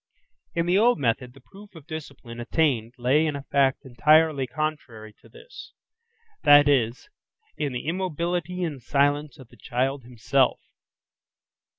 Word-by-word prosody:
In 170 0 0
the 180 +3 +3
old 240 +3 +4
method, 125 -1 -2
the 135 - -16
proof 200 +7 -16
of 160 -4 -13
discipline 140 -7 -9
attained 120 -3 0
lay 130 +5 +2
in 150 - -2
a 140 - -6
fact 140 0 +1
entirely 150 +2 +3
contrary 125 -7 -5
to - - -19
this; 485 +2 -13 0.7
that 145 0 +7
is, 125 -4 +1 0.5
in 145 -2 -3
the 125 - -5
immobility 175 +1 -2
and 150 -6 -4
silence 145 +2 0
of 130 -3 -14
the - - -19
child 135 +3 -2
himself. 125 +2 0
140 Hz, 145 wpm, -25 LUFS, 125-160 Hz, 0.7 s, that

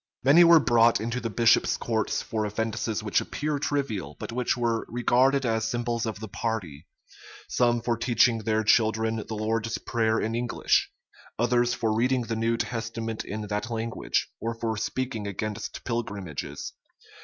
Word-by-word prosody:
Many 145 +7 +7
were 170 -1 +8
brought 120 -4 +4
into 115 +3 -2
the 115 -1 -3
bishops' 115 +1 +3
courts 110 -2 -1
for 110 -1 -2
offences 110 +1 -2
which 105 - +1
appear 150 -1 -3
trivial, 115 - -2
but - - -6
which 125 +1 0
were 115 -2 0
regarded 130 +3 +2
as 110 -1 0
symbols 120 0 -1
of 110 -2 -4
the 110 - -6
party: 100 -11 -4 0.6
some 120 -1 +1
for 120 0 +1
teaching 115 0 +3
their 110 0 0
children 110 +1 +2
the 110 0 -5
Lord's 110 +1 -1
prayer 110 -1 0
in 110 - -2
English; 120 0 +1 0.5
others 120 +1 +2
for 110 -1 0
reading 125 +3 +2
the 115 0 -3
New 115 +1 0
Testament 115 -1 -3
in 110 +2 -5
that 105 +2 -3
language, 115 0 -2
or 115 0 -3
for 115 -1 -2
speaking 115 -1 -3
against 105 +1 -5
pilgrimages. 100 - -4
115 Hz, 155 wpm, -26 LUFS, 110-120 Hz, 0.6 s, were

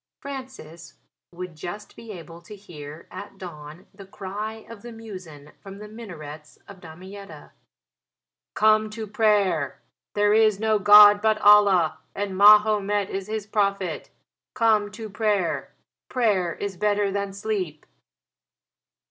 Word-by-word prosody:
Francis 260 - -10 0.4
would 180 -1 -8
just 175 +7 -8
be 230 -1 -11
able 170 -2 -11
to 190 +5 -12
hear 155 -5 -11
at 200 -1 -10
dawn 165 -1 -10
the 195 0 -12
cry 210 +3 -7
of 230 -3 -11
the 240 - -10
muezzin 185 -10 -11
from 195 0 -11
the 210 +1 -10
minarets 155 -9 -11
of 195 -2 -13
Damietta, 190 +5 -12 1.0
"Come 215 0 +3
to 220 +1 -6
prayer: 200 - +1 0.4
there 205 0 +3
is 215 -2 +3
no 220 -1 +1
God 205 0 +8
but 220 0 +2
Allah 205 -6 +4 0.2
and 200 -1 -4
Mahomet 205 0 +4
is 195 0 -5
his 215 -1 -4
prophet. 200 -3 -2 0.5
Come 220 -4 +2
to 220 +1 -7
prayer. 205 -4 -1 0.4
Prayer 205 -8 0
is 200 -2 -6
better 205 0 0
than 200 0 -3
sleep." 195 -6 -4
205 Hz, 130 wpm, -24 LUFS, 180-215 Hz, 1.0 s, God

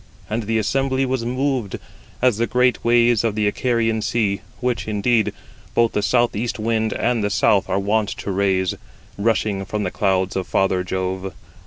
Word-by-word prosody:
88 - - -5
And 115 +1 -1
the 115 0 +1
assembly 135 +5 +1
was 130 -2 -2
moved, 130 -4 -1 0.5
as 125 -5 +4
the 115 +1 0
great 125 -1 +2
waves 120 -1 +4
of 110 -3 0
the 105 -1 +1
Icarian 115 0 0
Sea, 105 -3 0 0.2
which, 125 -2 -1
indeed, 110 +1 +1 0.4
both 115 -1 +3
the 105 - 0
south 120 +2 +2
east 115 +3 -2
wind 110 0 0
and 120 0 0
the 105 - +1
south 100 0 +2
are 95 - +1
wont 105 +1 +1
to 100 - -5
raise, 95 -1 +1
89 - - -16 0.4
rushing 105 -3 0
from 105 +1 -3
the 90 - -2
clouds 95 -2 0
of 95 -2 -2
father 95 -1 +1
Jove. 95 +1 -3
110 Hz, 185 wpm, -21 LUFS, 100-120 Hz, 0.5 s, as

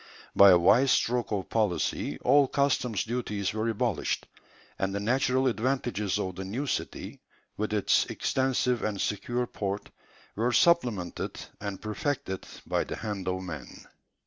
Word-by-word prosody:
By 100 - +9
a 90 - +8
wise 110 +10 +5
stroke 125 -2 +1
of 100 -3 -2
policy 105 -6 0
all 140 +2 +5
customs 130 -6 +1
duties 105 -5 -2
were 110 +1 -1
abolished; 115 -3 -1 0.5
and 95 0 -1
the - - -1
natural 130 +4 +1
advantages 120 -5 0
of 95 -3 -3
the 95 - -4
new 115 +10 -3
city, 135 - -4 0.3
with 110 +1 -2
its 105 -2 +2
extensive 130 -2 0
and 105 -2 -2
secure 120 +5 -1
port, 100 -3 -4 0.4
were 120 +4 0
supplemented 120 - +2 0.2
and 100 -2 -5
perfected 110 - -3 0.2
by - - 0
the - - -5
hand 100 -4 -5
of 95 0 -1
man. 80 -6 -8
110 Hz, 145 wpm, -28 LUFS, 100-125 Hz, 0.5 s, By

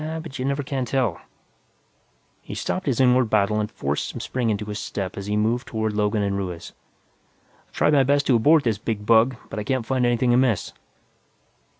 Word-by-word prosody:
Yeah, 160 +1 -4
but 155 -5 -8
you 130 - -2
never 140 +1 -1
can 135 -1 -2
tell_ 120 -7 -1 1.2
He - - -8
stopped 185 -3 -3
his 130 -3 0
inward 125 -2 +4
battle 105 0 +2
and 105 0 -2
forced 70 +1 -3
some - - -7
spring 125 -3 -2
into 105 0 -1
his 105 0 -5
step 95 -2 -4
as 100 0 -6
he 105 0 0
moved 115 +4 0
toward 110 -1 -2
Logan 105 0 0
and 100 -1 -1
Ruiz. 90 -4 -5 0.9
"I've - - -36
tried 150 - +3
my 140 - +5
best 140 +1 +2
to 130 - +3
abort 150 +7 +4
this 110 -4 0
big 105 -1 -4
bug, 115 +3 +4 0.2
but - - -4
I - - -3
can't 130 +1 -1
find 130 +1 0
anything 120 0 +2
amiss." 125 -5 +1
115 Hz, 205 wpm, -23 LUFS, 105-130 Hz, 1.2 s, my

